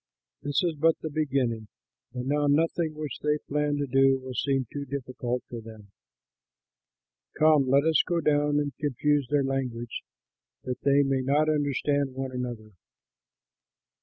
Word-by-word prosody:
This 145 +4 0
is 170 -2 +1
but 165 +1 +4
the 155 - -4
beginning, 130 -7 -1 0.5
and 125 0 -3
now 145 +2 +1
nothing 160 +2 +1
which 150 -4 -5
they 150 0 +1
plan 150 0 -1
to 145 - -1
do 135 0 +4
will 130 0 -8
seem 135 +1 0
too 145 - -3
difficult 125 -2 -4
for 120 -1 -7
them. 110 -3 -13 1.5
Come, 155 -3 +5
let 140 +2 +4
us 160 -2 +4
go 175 -1 +1
down 145 -2 +2
and 145 -1 -2
confuse 145 -1 +1
their 145 -1 +2
language, 125 -3 -3 0.6
that 125 -1 -4
they 140 0 +4
may 135 -1 0
not 145 +4 +2
understand 145 -2 0
one 135 0 -4
another." 120 -4 -5
140 Hz, 150 wpm, -27 LUFS, 130-150 Hz, 1.5 s, Come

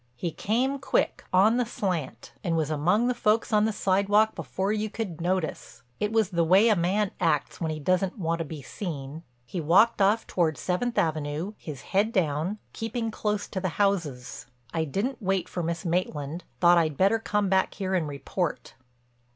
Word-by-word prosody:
He 165 +7 -3
came 255 - 0
quick, 270 - 0
on 205 +6 +5
the 250 - +1
slant, 180 - -3
and 170 -3 0
was 155 -1 0
among 175 +10 +2
the 250 - +2
folks 225 -1 +1
on 210 0 +4
the 220 - +1
sidewalk 205 +2 +2
before 180 +6 -2
you 215 0 -1
could 195 -7 -5
notice. 170 -9 -2 0.2
It 210 - 0
was 220 -4 +2
the 170 -1 +2
way 190 +7 +5
a 215 - +5
man 190 +3 +1
acts 160 -3 0
when 165 - 0
he 155 -1 -3
doesn't 185 +6 0
want 165 -3 -1
to 165 - -2
be 150 -2 -8
seen. 155 -5 -6 0.2
He 175 - -4
walked 195 +9 +4
off 210 +4 +3
toward 160 -4 0
Seventh 230 +7 -1
Avenue, 155 +4 -1
his 150 -8 -8
head 205 +4 +1
down, 170 +1 0 0.2
keeping 225 0 -3
close 210 -1 -2
to 190 - -3
the 185 0 -1
houses. 150 - -1 0.3
I 160 -1 0
didn't 220 - -2
wait 190 -2 0
for 180 - -4
Miss 170 +2 -3
Maitland—thought 170 +1 +1
I'd 155 -4 0
better 200 +4 +3
come 210 -2 0
back 190 0 +1
here 190 -2 -2
and 175 -5 +1
report." 150 +4 -3
185 Hz, 185 wpm, -27 LUFS, 160-210 Hz, 0.3 s, on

